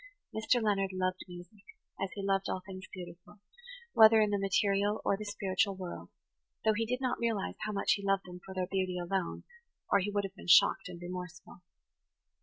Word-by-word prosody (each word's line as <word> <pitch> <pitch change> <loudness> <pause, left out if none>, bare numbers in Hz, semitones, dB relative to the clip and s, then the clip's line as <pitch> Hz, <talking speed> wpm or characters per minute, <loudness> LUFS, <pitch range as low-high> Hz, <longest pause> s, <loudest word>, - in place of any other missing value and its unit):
Mr. 220 +3 +2
Leonard 200 -3 +1
loved 185 0 -1
music, 180 +3 -12 0.4
as 195 - -1
he 200 - -5
loved 195 0 +1
all 185 - -3
things 185 -1 -9
beautiful, 180 +3 -11 0.5
whether 220 0 +8
in 210 -1 +3
the 205 - +1
material 200 +1 +1
or - - +3
the 210 - -6
spiritual 200 -1 0
world, 185 -2 -7 0.6
though 220 - +5
he 225 +1 -1
did 250 +2 -2
not 255 -2 -1
realize 225 -4 -1
how - - -2
much 200 - +1
he 200 - +1
loved 195 0 +1
them 180 0 -10
for 190 - -10
their 185 -1 0
beauty 185 -1 -1
alone, 180 0 -2 0.5
or 200 - +5
he 195 +2 -1
would 205 0 0
have 195 -1 -5
been 190 - -13
shocked 175 - +5
and 175 -1 -9
remorseful. 180 0 -8
195 Hz, 195 wpm, -32 LUFS, 185-205 Hz, 0.6 s, whether